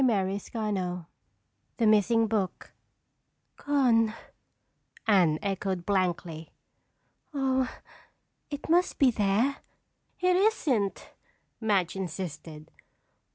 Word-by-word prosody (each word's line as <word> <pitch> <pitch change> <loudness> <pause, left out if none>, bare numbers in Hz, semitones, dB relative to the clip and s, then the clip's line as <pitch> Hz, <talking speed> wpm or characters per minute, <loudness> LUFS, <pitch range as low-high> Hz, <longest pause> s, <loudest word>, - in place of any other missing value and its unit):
CHAPTER 200 -5 +1
XIII 195 -5 -3 0.8
The 230 - +2
Missing 215 +2 +4
Book 210 -4 -2 0.8
"Gone," 240 -6 +2 0.9
Anne 180 -8 +4
echoed 190 -2 -2
blankly. 175 -5 -1 0.9
"Oh, 265 -2 +1 0.8
it 290 -1 -6
must 350 +3 +2
be 270 -4 +5
there." 220 +6 +1 0.6
"It 365 0 +3
isn't," 305 - +1 0.5
Madge 200 -6 +1
insisted. 165 -4 -6
210 Hz, 80 wpm, -28 LUFS, 185-255 Hz, 0.9 s, be